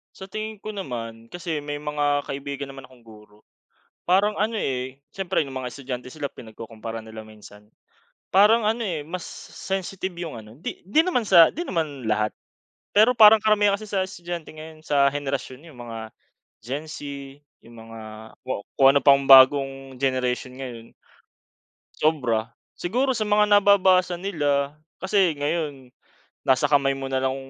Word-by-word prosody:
Sa 190 - -10
tingin 215 +1 -6
ko 215 0 -7
naman, 115 - -7
kasi 165 -4 -4
may 145 0 -5
mga 145 -1 -1
kaibigan 140 0 -5
naman 135 -1 -10
akong 130 -1 -17
guro. 105 -1 -18 0.6
Parang 200 +4 +2
ano 220 +3 0
eh, 130 0 -3
siyempre 190 +2 -2
yung 135 -2 -8
mga 125 -1 -4
estudyante 130 -2 -7
sila 145 -2 -4
pinagkukumpara 115 -1 -9
nila 110 0 -10
minsan. 105 0 -16 0.6
Parang 210 +4 +5
ano 220 +3 0
eh, 165 -8 -3
mas 175 +2 -5 0.3
sensitive 190 -1 -4
yung 170 -3 -6
ano 110 +1 -15
di - - -6
di 205 - +2
naman 345 -10 +1
sa 170 -3 +7
di 335 - -6
naman 145 - -3
lahat, 105 0 +1 0.6
pero 220 +5 +5
parang 220 -1 +9
karamihan 210 -1 +3
kasi 215 - -9
sa 195 -2 0
estudyante 175 -3 -7
ngayon, 155 0 -12
sa 140 -1 +3
henerasyon, 140 -1 -4
yung 155 -7 -15
mga 115 -2 -7 0.5
Gen 140 +6 -4
Z, 155 - -8 0.6
yung 120 - -15
mga 115 0 -11 0.5
ku 130 -6 -3 0.2
kung 135 - +7
ano 140 - +4
pang 140 -1 +5
bagong 135 0 +6
generation 130 -1 -1
ngayon. 120 -4 -9 1.1
Sobra, 120 -7 0 0.2
siguro 255 +9 0
sa 215 -4 -2
mga 210 0 +4
nababasa 185 -3 +4
nila. 145 -6 -1 0.2
Kasi 190 -4 +2
ngayon, 145 -3 -3 0.5
nasa 130 +2 +3
kamay 140 -1 +3
mo 135 0 -5
nalang 130 0 -1
145 Hz, 155 wpm, -24 LUFS, 130-190 Hz, 1.1 s, parang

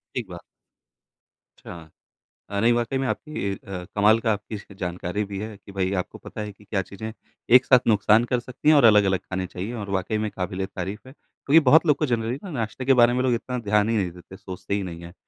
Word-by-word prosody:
ठीक 125 - -2
बात। 85 -1 -8 1.2
अच्छा। 85 -3 -11 0.6
हाँ, 100 -1 -1
नहीं 115 +2 +4
वाक़ई 120 +2 0
में 135 - -1
आपकी 125 -11 -3
अ, 95 -2 -8
कमाल 105 +2 +5
का 110 -1 +1
आपकी 105 +1 -5
इसकी 100 -1 -9
जानकारी 90 +2 -3
भी 100 -1 -6
है 110 -1 -6
कि 100 0 -15
भाई 95 0 -1
आपको - - -8
पता - - -9
है 105 -1 -5
कि 105 +1 -21
क्या 100 -1 -1
चीज़ें 110 +4 -8 0.4
एक 130 - +4
साथ 125 -2 +5
नुकसान 110 +2 +4
कर 125 - +2
सकती 125 +5 -4
हैं 155 - +8
और 140 - +5
अलग-अलग 100 -4 +5
ख़ानी 95 0 -4
चाहिए 95 +6 -6
और 100 -3 -6
वाक़ई 95 +3 -1
में 105 -1 -2
काबिले 95 +1 -4
तारीफ़ 95 +2 -6
है। - - -12
क्योंकि 150 +1 +1
बहुत 160 +4 +5
लोगों 150 - +5
को 150 - +1
जनरली 120 +1 -1
नाश्ते 120 +1 -4
के 135 - +4
बारे 120 -1 +5
में 125 - 0
लोग 130 -2 +2
इतना 125 +2 -3
ध्यान 105 -1 +1
ही 115 - +1
नहीं 95 -4 0
देते 90 +2 -14
हैं, - - -9
सोचते 95 +1 -5
ही 100 - -1
नहीं 85 -2 -7
हैं। 85 +1 -10
105 Hz, 235 wpm, -24 LUFS, 95-120 Hz, 1.2 s, हैं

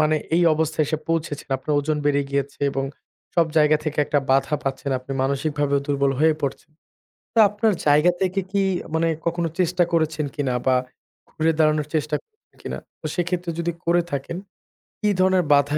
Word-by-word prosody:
মানে 155 0 +3 0.2
এই 175 - +4
অবস্থায় 160 0 0
এসে 155 - -1
পৌঁছেছেন। 165 -3 -2
আপনার 150 +3 -3
ওজন 150 +1 -1
বেড়ে 145 -1 +3
গিয়েছে, 140 0 -2
এবং 135 0 -2 0.5
সব 170 -2 +4
জায়গা 155 0 +5
থেকে 155 -1 -3
একটা 145 - +1
বাধা 135 +2 +3
পাচ্ছেন। 135 +1 -3
আপনি 130 +2 -8
মানসিকভাবেও 140 +1 0
দুর্বল 140 -1 +1
হয়ে 160 0 +5
পড়ছেন। 140 +2 -4 0.6
তো - - +1
আপনার 210 +2 +1
জায়গা 150 +4 +5
থেকে 190 +1 +1
কি 200 0 +1 0.3
মানে 165 +1 +2 0.2
কখনো 170 0 0
চেষ্টা 180 0 +2
করেছেন 160 -2 +1
কিনা 135 -4 -1
বা 130 -1 +4 0.5
ঘুরে 160 +1 +1
দাঁড়ানোর 155 -1 +2
চেষ্টা 150 -1 0 0.5
কিনা? - - -5 0.2
তো 155 - -5
সেক্ষেত্রে 175 0 -1
যদি 170 0 -1
করে 175 +1 +3
থাকেন, 140 +5 -3 0.6
কি 210 - +1
ধরনের 185 -1 +3
বাধা 145 +1 +3
155 Hz, 165 wpm, -23 LUFS, 145-170 Hz, 0.6 s, জায়গা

